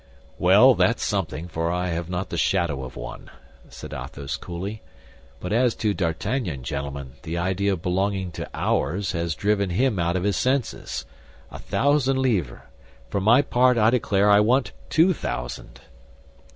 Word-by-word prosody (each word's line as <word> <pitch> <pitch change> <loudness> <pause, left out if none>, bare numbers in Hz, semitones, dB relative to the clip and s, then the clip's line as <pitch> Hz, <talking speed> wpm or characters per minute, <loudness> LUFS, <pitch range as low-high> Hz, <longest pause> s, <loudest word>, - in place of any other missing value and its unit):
"Well, - - +7
that's - - +2
something, 85 +3 -2
for 80 0 -2
I 90 +1 -1
have 85 0 -3
not 90 +1 -3
the - - -2
shadow 85 -7 0
of 65 -1 -8
one," - - -8 0.4
said - - -9
Athos 70 -1 -5
coolly; 95 +5 -6 0.6
"but 90 - -4
as 120 0 +2
to 105 -2 0
D'Artagnan, 90 - -2
gentlemen, 70 0 -5
the 85 0 -4
idea 95 +3 0
of 85 - -6
belonging 95 0 -1
to - - -6
ours 95 +8 -1
has 85 -3 -2
driven 100 -1 +1
him 110 +3 +1
out 85 +1 0
of 90 - -1
his 100 -2 +1
senses. 130 - -1 0.5
A - - -8
thousand 135 -1 +1
livres! 105 - 0 0.5
For 100 - 0
my 120 +8 +5
part, 125 -1 +3
I 110 0 +4
declare 105 -4 +2
I 100 - +7
want 125 +5 +2 0.2
two 175 +4 +4
thousand." - - -6
95 Hz, 160 wpm, -24 LUFS, 85-110 Hz, 0.6 s, Well